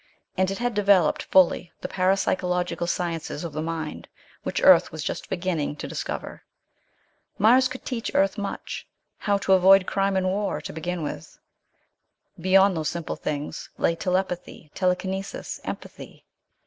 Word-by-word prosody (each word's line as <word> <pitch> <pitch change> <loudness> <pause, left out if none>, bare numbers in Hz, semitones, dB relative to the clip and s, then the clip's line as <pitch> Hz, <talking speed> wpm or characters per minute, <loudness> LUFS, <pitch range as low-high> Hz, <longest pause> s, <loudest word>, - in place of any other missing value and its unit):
And 185 0 +2
it 195 - -3
had 245 0 -1
developed 200 -5 +3
fully 180 -1 +4
the - - -3
parapsychological 180 -2 0
sciences 170 -3 -3
of 165 -3 -5
the 155 - -3
mind, 160 -1 -4 0.3
which - - -2
Earth - - +7
was - - -5
just - - -4
beginning 170 -5 -2
to - - -6
discover. - - -5 1.0
Mars 250 +5 +5
could 255 0 -9
teach 240 -4 -3
Earth 195 0 +3
much. 205 -2 -5 0.3
How 205 -1 +1
to 195 -1 +2
avoid 190 +1 +6
crime 195 0 0
and 185 - +1
war 200 +2 -1
to - - -8
begin 170 +2 -3
with. 80 - -6 1.0
Beyond 190 +2 +4
those 155 -2 -1
simple 170 -2 -4
things 150 +1 -4
lay - - +2
telepathy, 180 -4 -3
telekinesis, 190 +1 -2
empathy.... - - -8
185 Hz, 145 wpm, -25 LUFS, 170-195 Hz, 1.0 s, Earth